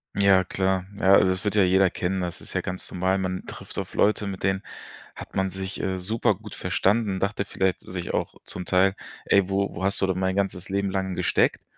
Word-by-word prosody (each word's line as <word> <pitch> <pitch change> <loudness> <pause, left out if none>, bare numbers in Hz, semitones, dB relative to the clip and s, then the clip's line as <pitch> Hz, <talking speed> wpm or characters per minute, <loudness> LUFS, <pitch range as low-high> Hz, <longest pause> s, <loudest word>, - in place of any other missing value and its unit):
Ja 100 -2 +5
klar. 95 0 0
Ja, 95 -2 +5
also 95 -1 +6
es 95 +2 -3
wird 105 0 -1
ja 105 - +5
jeder 95 +1 +4
kennen. 95 +2 -2
Das 90 -1 -4
ist - - -10
ja - - 0
ganz 90 0 -6
normal. 95 +1 +1
Man 95 -1 -3
trifft - - -9
auf - - -4
Leute, 105 0 +2
mit 95 -2 -5
denen 95 0 +1 0.5
hat - - -10
man 95 0 +1
sich, 95 +1 -5
äh, 95 -1 -1
supergut 110 +5 -1
verstanden, 100 -1 +1
dachte 100 +1 -1
vielleicht 95 -2 0
sich 90 -2 -5
auch - - -2
zum 90 - -6
Teil: 95 +1 +3 0.3
„Ey, 100 -1 +3
wo 100 0 0
wo 85 - -5
hast 100 +1 +1
du 95 - +3
denn 95 -1 0
mein 95 0 0
ganzes 95 -2 -2
Leben 100 0 0
lang 95 -1 -1
gesteckt?" - - +1
95 Hz, 220 wpm, -25 LUFS, 95-100 Hz, 0.5 s, also